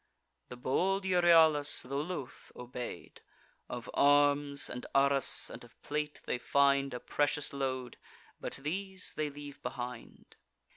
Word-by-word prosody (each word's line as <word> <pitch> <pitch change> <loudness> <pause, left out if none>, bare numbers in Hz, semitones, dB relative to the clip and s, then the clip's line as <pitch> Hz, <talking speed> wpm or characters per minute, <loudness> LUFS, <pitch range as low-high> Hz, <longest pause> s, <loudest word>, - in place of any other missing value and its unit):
The - - -7
bold 190 +10 0
Euryalus, 165 -5 +4
tho' 140 +2 -3
loth, 145 -5 -6
obey'd. 125 0 -8 0.5
Of 120 -1 -6
arms, 145 0 +3
and 125 - -6
arras, 140 0 +3
and - - -9
of 120 - -18
plate, 150 0 -3
they 125 - -1
find 140 +1 +3
A - - -4
precious 145 +1 0
load; 130 -3 -3 0.4
but - - -4
these 190 +4 -2
they 155 -1 -1
leave 145 0 -10
behind. 125 -2 -7
140 Hz, 130 wpm, -32 LUFS, 130-150 Hz, 0.5 s, Euryalus